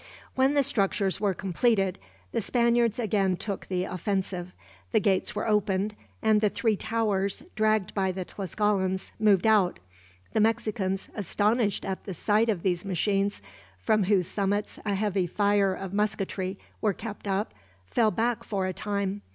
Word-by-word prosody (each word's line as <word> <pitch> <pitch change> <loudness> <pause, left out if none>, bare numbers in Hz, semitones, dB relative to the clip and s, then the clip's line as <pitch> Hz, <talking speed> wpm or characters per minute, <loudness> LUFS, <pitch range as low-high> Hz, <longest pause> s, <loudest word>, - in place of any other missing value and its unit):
When 265 +2 +3
the 285 - +4
structures 200 -6 0
were 200 -3 +1
completed, 195 0 +1 0.3
the - - 0
Spaniards 235 0 +2
again 200 -5 +1
took 200 -1 -5
the 180 -1 -1
offensive. 185 -1 -3 0.4
The 220 - +5
gates 200 -2 +1
were 210 - -2
opened, 210 -1 +1 0.3
and 215 -1 +4
the 210 - +4
three 220 +1 +1
towers, 205 -3 -1
dragged 215 -3 +2
by 190 -2 +1
the 185 0 -4
Tlascalans, 190 0 -1
moved 205 -3 +4
out. 210 -5 +4 0.6
The - - +2
Mexicans, 215 -3 0
astonished 210 +2 0
at 190 -1 -4
the 190 - -5
sight 215 +6 +2
of 195 -6 0
these 180 -1 0
machines, 195 - 0 0.3
from 200 - +2
whose 190 -2 +3
summits 200 +3 -1
a 200 - +1
heavy 195 -3 0
fire 200 0 +2
of 190 0 -6
musketry 195 -2 -1 0.2
were 210 -2 +2
kept 210 0 -7
up, 195 +2 -1 0.3
fell 220 - +2
back 230 +1 0
for 195 -3 -2
a 185 - -2
time. 200 0 -2
200 Hz, 155 wpm, -27 LUFS, 190-215 Hz, 0.6 s, The